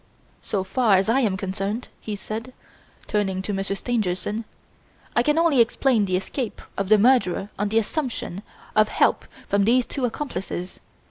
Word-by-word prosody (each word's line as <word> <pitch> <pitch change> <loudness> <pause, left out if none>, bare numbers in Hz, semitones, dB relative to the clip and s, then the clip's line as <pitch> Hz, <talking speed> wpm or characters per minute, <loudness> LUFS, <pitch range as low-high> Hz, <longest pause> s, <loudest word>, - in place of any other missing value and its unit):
So 195 -2 -2
far 200 +1 +3
as 195 +3 +1
I 245 +4 +4
am 210 -7 +1
concerned," 195 +4 -3
he 215 - -5
said, 225 +5 -6 0.5
turning 195 -3 -1
to 205 - -3
Monsieur 195 0 -1
Stangerson, 210 -1 -2 0.7
"I - - +5
can 295 +5 +2
only 330 -7 +5
explain 230 -1 +2
the 185 -1 +1
escape 225 +5 -4 0.2
of 195 -1 -2
the 215 - +7
murderer 210 -4 +3
on 205 0 0
the 220 - +1
assumption 225 - -2 0.3
of 215 0 +5
help - - +2 0.2
from 200 0 +2
these 240 +4 +4
two 275 - -5
accomplices. 195 -8 -4
215 Hz, 160 wpm, -24 LUFS, 195-245 Hz, 0.7 s, the